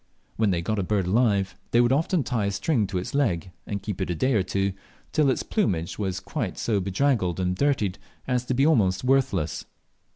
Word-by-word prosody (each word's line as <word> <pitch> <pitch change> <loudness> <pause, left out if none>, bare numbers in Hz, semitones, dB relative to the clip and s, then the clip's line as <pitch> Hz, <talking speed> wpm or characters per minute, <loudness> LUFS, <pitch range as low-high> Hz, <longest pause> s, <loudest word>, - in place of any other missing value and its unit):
When 110 -2 +2
they 85 -3 0
got 110 +3 -1
a - - +2
bird 100 0 0
alive 100 -2 +2
they 120 - +3
would 120 0 +4
often 160 +3 +2
tie 115 -7 -1
a - - 0
string 105 +2 0
to 95 -1 -3
its 90 - -4
leg, 95 - 0 0.2
and 100 -1 -4
keep 100 -2 -4
it 95 - -1
a 90 - -1
day 130 +10 +1
or 105 - +3
two, 95 +1 -1 0.4
till 150 -3 +3
its 130 - 0
plumage 90 - -1
was 95 -2 -2 0.3
so 110 -3 0
draggled 95 -1 0
and 90 0 0
dirtied 105 -6 0 0.3
as 125 -1 +1
to 125 - -1
be 135 +3 +3
almost 105 -12 +3
worthless. 125 - +1
100 Hz, 205 wpm, -25 LUFS, 95-130 Hz, 0.4 s, would